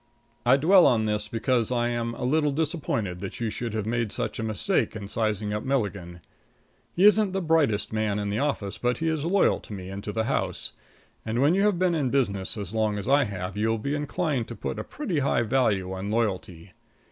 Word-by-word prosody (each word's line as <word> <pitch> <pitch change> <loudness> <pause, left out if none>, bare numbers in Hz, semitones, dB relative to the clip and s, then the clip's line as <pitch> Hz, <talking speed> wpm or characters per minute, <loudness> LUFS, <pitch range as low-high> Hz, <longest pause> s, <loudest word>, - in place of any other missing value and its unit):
I 130 +2 +7
dwell 180 +6 +6
on 110 -3 +3
this 105 0 -1
because 115 +1 0
I 120 -1 +1
am 115 0 -2
a - - -6
little 150 +3 +2
disappointed 140 - -2
that 95 0 -6
you 115 -2 -1
should 115 -1 -4
have 110 -2 -2
made 115 -1 -1
such 120 -3 -3
a - - -2
mistake 110 -1 0
in 105 -2 -6
sizing 105 -1 -1
up 105 - -2
Milligan. 100 -10 -2 0.7
He 185 - +4
isn't 210 -2 +5
the 195 - 0
brightest 145 - +1
man 110 -2 0
in 105 -1 -2
the 105 - -1
office, 135 -9 -2
but 120 -1 0
he 165 - -2
is 160 -2 -1
loyal 190 +3 +3
to - - -11
me 95 -1 -7
and 100 +1 -6
to 105 - -4
the 110 +1 -1
house, 130 - -1 0.5
and 115 +2 -2
when 145 +5 +4
you 195 - +2
have 205 -3 +3
been 180 -1 +2
in 145 -6 0
business 105 -7 -1
as 100 -1 -6
long 110 -2 +1
as 100 - -5
I 140 +1 +4
have 95 -2 -5
you 110 +2 0
will 115 - +1
be 140 +6 -3
inclined 145 -3 -1
to 120 - -7
put 110 - -4
a - - -3
pretty 195 - -3
high 135 -3 +1
value 105 -6 +1
on 95 +2 -4
loyalty. 95 -6 -2
115 Hz, 225 wpm, -26 LUFS, 105-140 Hz, 0.7 s, I